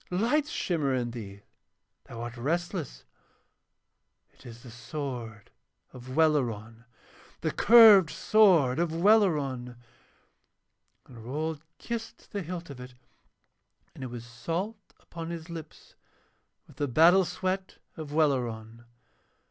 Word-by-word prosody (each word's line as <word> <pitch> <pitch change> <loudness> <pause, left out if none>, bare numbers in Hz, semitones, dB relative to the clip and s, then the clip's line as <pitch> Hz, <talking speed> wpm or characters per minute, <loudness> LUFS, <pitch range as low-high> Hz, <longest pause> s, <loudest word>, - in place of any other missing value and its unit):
Lights 245 +11 0
shimmer 150 -7 -1
in 120 -2 -2
thee, 100 -4 -9 0.6
thou 115 -1 -9
art 120 0 -6
restless. 160 - -3 1.3
It - - -16
is 115 0 -12
the 120 - -11
sword 120 -4 -7 0.4
of 130 +1 -9
Welleran, 115 -8 0 0.6
the - - -1
curved 215 -7 +7
sword 170 - +3
of 170 -1 +1
Welleran!' 160 - +2 1.3
And 115 -3 -13
Rold 150 +5 -4 0.2
kissed 230 -1 -7
the 205 - -3
hilt 170 -2 -7
of 135 - -10
it, 125 0 -11 1.0
and - - -9
it - - -4
was 120 -1 -8
salt 165 - -4 0.2
upon 165 0 -8
his 170 0 -7
lips 160 -2 -10 0.7
with 140 - -20
the 145 -1 -1
battle 165 +8 +5
sweat 185 +2 -4 0.2
of 155 -3 -8
Welleran. 120 -7 -1
150 Hz, 115 wpm, -28 LUFS, 120-175 Hz, 1.3 s, curved